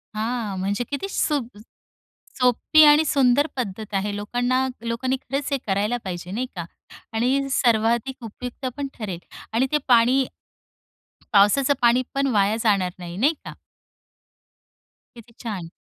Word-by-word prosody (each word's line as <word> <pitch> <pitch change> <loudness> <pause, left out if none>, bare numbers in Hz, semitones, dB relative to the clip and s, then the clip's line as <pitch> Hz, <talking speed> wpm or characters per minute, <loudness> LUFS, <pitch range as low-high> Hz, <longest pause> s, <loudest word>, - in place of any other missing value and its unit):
हां, 220 -2 -2
म्हणजे 200 +5 -1
किती 285 +7 -3
सुद् 275 - -1 0.8
सोपी 250 +5 +5
आणि 295 +2 +6
सुंदर 275 +1 +3
पद्धत 215 -3 -4
आहे, 200 +1 0
लोकांना 245 +5 0 0.2
लोकांनी 250 +3 -1
खरंच 280 +1 -3
हे 275 - +2
करायला 205 +5 0
पाहिजे 180 -1 -6
नाही 250 +5 -2
का 170 - -4 0.5
आणि 260 +5 +1
सर्वाधिक 235 +1 +1
उपयुक्तपण 255 +4 -6
ठरेल 195 -7 -5 0.3
आणि 255 +4 +2
ते 300 - +3
पाणी 250 +2 +4 1.1
पावसाचं 235 +8 +4
पाणीपण 255 +3 +2
वाया 205 +1 +3
जाणार 195 -5 +2
नाही, 175 0 -8
नाही 285 +10 +2
का? - - -7 1.6
किती 235 0 -15
छान. 190 -7 -5
240 Hz, 125 wpm, -23 LUFS, 205-265 Hz, 1.6 s, आणि